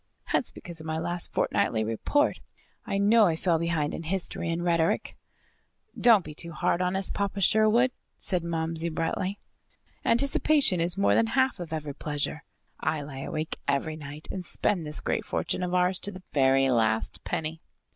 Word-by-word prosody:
"That's - - +1
because 170 -2 -9
of 160 - -9
my 160 0 -1
last 175 +1 -1
fortnightly 110 - +1
report. 115 - +1 0.5
I 195 - -1
know 210 +2 +5
I 165 - +1
fell 165 0 +1
behind 165 -3 -1
in - - -4
history 170 0 -2
and 165 +1 -1
rhetoric." 170 -2 +1 0.8
"Don't 225 -7 +5
be - - -7
too 170 +2 -3
hard 175 +2 0
on 180 +1 0
us, 190 0 +1
Papa 200 0 -2
Sherwood," 220 +5 +4 0.3
said 180 -3 -2
Momsey 165 0 -1
brightly. 165 +4 -2 0.7
"Anticipation 275 - +3
is 175 +2 0
more 200 - +3
than 230 - +3
half 260 0 +1
of 175 -3 -6
every 150 -3 -4
pleasure. 150 +2 -3 0.4
I 155 -1 -1
lie 140 -2 -8
awake 155 +3 -4
every 155 +3 0
night 150 0 -8
and 190 - -4
spend 175 -2 0
this 150 - -4
great - - -1
fortune - - -2
of 180 0 -1
ours 180 0 +2
to 205 - 0
the 185 -1 -11
very 135 -1 +4
last 110 -2 +1
penny." 160 +1 -3
170 Hz, 175 wpm, -27 LUFS, 155-195 Hz, 0.8 s, know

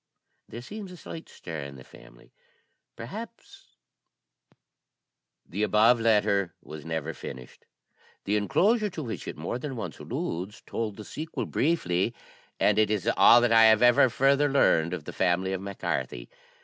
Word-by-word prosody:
There 120 +1 -8
seems 205 +5 -8
a 180 - -11
slight 165 0 -9
stir 80 -3 -8
in 70 -1 -7
the 65 - -12
family; - - -18 0.6
perhaps - - -10 1.0
" - - -59
The 100 +5 -3
above 110 +3 +4
letter 105 -4 +2
was 75 -1 -10
never 80 -1 -4
finished. 65 -4 -10 0.6
The 100 - 0
enclosure 205 - +2
to 165 -5 -6
which 115 -4 -6
it - - -6
more 85 +10 -4
than 135 0 -5
once 115 - -6
alludes 95 +6 -5
told 110 -3 -4
the 105 - -9
sequel 160 +2 -5
briefly, 115 - 0 0.4
and - - +3
it 110 - +3
is 105 -4 -1
all 120 - +7
that 120 -1 +2
I 115 0 +7
have 120 +3 +5
further 140 +3 +3
learned 85 - +3
of 85 - -8
the - - -8
family 95 +1 0
of 95 - -3
Mac 100 0 -7
Carthy. - - -3
105 Hz, 160 wpm, -27 LUFS, 85-125 Hz, 1.0 s, all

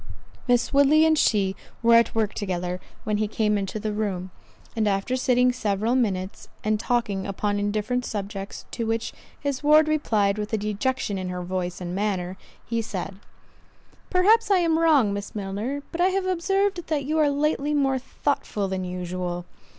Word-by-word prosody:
Miss 245 +1 +2
Woodley 285 +3 +6
and 320 0 +4
she 200 -9 +2 0.3
were 235 0 +6
at 230 0 +5
work 220 -2 +1
together 180 -2 -3 0.2
when 210 -1 0
he 215 0 0
came 210 0 +1
into 200 +1 -2
the 215 0 -2
room; 190 -4 -2 0.4
and 220 -2 +1
after 195 +5 0
sitting 250 -1 +3
several 220 -1 0
minutes, 195 -7 -1 0.2
and 215 0 +1
talking 210 -5 -1
upon 205 +1 -1
indifferent 215 +4 -1
subjects, 200 -2 -5
to 230 -2 -3
which 225 0 -1 0.3
his 280 -2 -2
ward 305 +1 +6
replied 215 -10 +1
with 210 +1 -4
a - - +3
dejection 210 0 -1
in 185 -1 -4
her 180 0 -4
voice 180 -1 -3
and 175 -1 -5
manner—he 195 +3 -3
said, 195 -2 -5 0.9
"Perhaps 425 +5 +4
I 395 - +5
am 330 -2 +2
wrong, 290 -11 +4
Miss 200 +1 -6
Milner, 210 +8 -3
but 345 - -2
I 360 - +5
have 380 0 0
observed 370 0 0
that 295 -3 -1
you 310 +3 0
are 300 -2 +4
lately 295 0 0
more 270 -2 +2
thoughtful 250 -6 -2
than 190 -1 -3
usual." 180 -1 -4
215 Hz, 170 wpm, -25 LUFS, 195-280 Hz, 0.9 s, Woodley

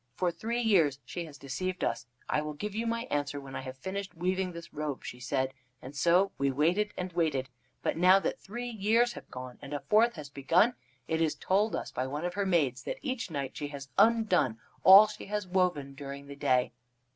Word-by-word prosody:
For 180 -2 +1
three 230 +8 -2
years 165 - +4
she 170 +6 -5
has 150 -3 -11
deceived 180 +8 -4
us. 120 - -1 0.2
'I 150 - +1
will 150 0 -4
give 210 +7 -5
you 225 +2 -2
my 230 0 -1
answer 145 0 -1
when 135 -1 -9
I - - -3
have 130 0 -8
finished 190 +5 -5
weaving 185 +1 0
this 170 -1 -10
robe,' 150 -2 -4
she 125 - -7
said, 130 +2 -1 0.3
and 135 +4 -10
so 175 +6 +3
we 140 0 +2
waited 170 +10 +1
and 180 -1 -4
waited. 150 -6 0 0.3
But - - 0
now 185 +3 +7
that - - -2
three 240 +4 -6
years 230 +3 +2
have - - -11
gone 125 -1 -8
and 145 - -6
a - - -2
fourth 225 +7 +3
has 150 -4 -8
begun, 165 - +3 0.3
it 160 0 0
is 160 -2 +1
told 205 +4 +1
us - - -4
by 130 - -2
one 145 +5 -3
of 175 - -2
her 200 0 -1
maids 140 -9 +2
that - - -4
each 260 -7 -3
night 140 -4 -4
she 145 - -4
has 140 -1 -8
undone 205 - +3 0.3
all 195 +3 +10
she 210 -1 -8
has 210 0 -2
woven 180 -7 0
during 140 0 -8
the 140 0 -9
day. 130 -2 +2
170 Hz, 215 wpm, -30 LUFS, 140-200 Hz, 0.3 s, all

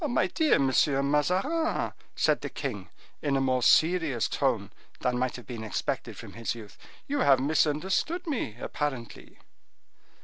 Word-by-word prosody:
"My 240 - +2
dear 300 - +2
Monsieur 135 +1 +2
Mazarin," 185 - +1 0.2
said - - +2
the - - -4
king, - - -5 0.3
in 140 -2 +1
a - - +2
more 130 -1 +1
serious 155 - +3
tone - - 0 0.3
than 125 -1 0
might 130 0 -1
have 125 - -9
been 115 -3 -6
expected 110 - -3
from - - -10
his 115 0 -3
youth, 110 -3 -11 0.3
"you 285 +1 -1
have 135 - +5
misunderstood 160 - +1
me, 240 - -3
apparently." 135 -6 -5
145 Hz, 145 wpm, -28 LUFS, 125-185 Hz, 0.3 s, have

